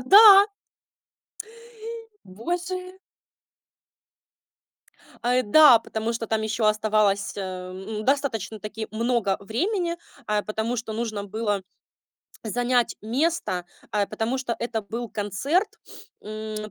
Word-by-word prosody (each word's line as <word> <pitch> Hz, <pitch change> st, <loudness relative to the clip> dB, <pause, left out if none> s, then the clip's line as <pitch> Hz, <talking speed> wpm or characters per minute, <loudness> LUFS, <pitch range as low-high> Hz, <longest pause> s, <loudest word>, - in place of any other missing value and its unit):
"Да!". 400 Hz, -, +9 dB, 1.8 s
Боже! 355 Hz, -, -4 dB, 2.3 s
А, 250 Hz, +1 st, +3 dB
да. 245 Hz, +1 st, +8 dB
Потому 225 Hz, +1 st, -3 dB
что 225 Hz, -1 st, -4 dB
там 220 Hz, -1 st, 0 dB
ещё 220 Hz, 0 st, -1 dB
оставалось, 215 Hz, -1 st, +2 dB
э, 185 Hz, -2 st, -5 dB
ну, 210 Hz, +3 st, -6 dB
достаточно-таки 225 Hz, -5 st, -2 dB
много 225 Hz, -3 st, 0 dB
времени, 340 Hz, -, -1 dB, 0.3 s
э, 210 Hz, 0 st, +1 dB
потому 220 Hz, +3 st, -2 dB
что 220 Hz, -1 st, -4 dB
нужно 215 Hz, -3 st, -3 dB
было 205 Hz, -1 st, -2 dB, 0.8 s
занять 245 Hz, +2 st, 0 dB
место, 245 Hz, -, -1 dB, 0.3 s
э, 205 Hz, -1 st, +1 dB
потому 235 Hz, +4 st, -2 dB
что 240 Hz, -3 st, -2 dB
это 230 Hz, -2 st, -2 dB
был 230 Hz, +4 st, -5 dB
концерт, 245 Hz, -, 0 dB, 0.5 s
м, 215 Hz, 0 st, -6 dB
225 Hz, 100 wpm, -25 LUFS, 210-255 Hz, 2.3 s, Да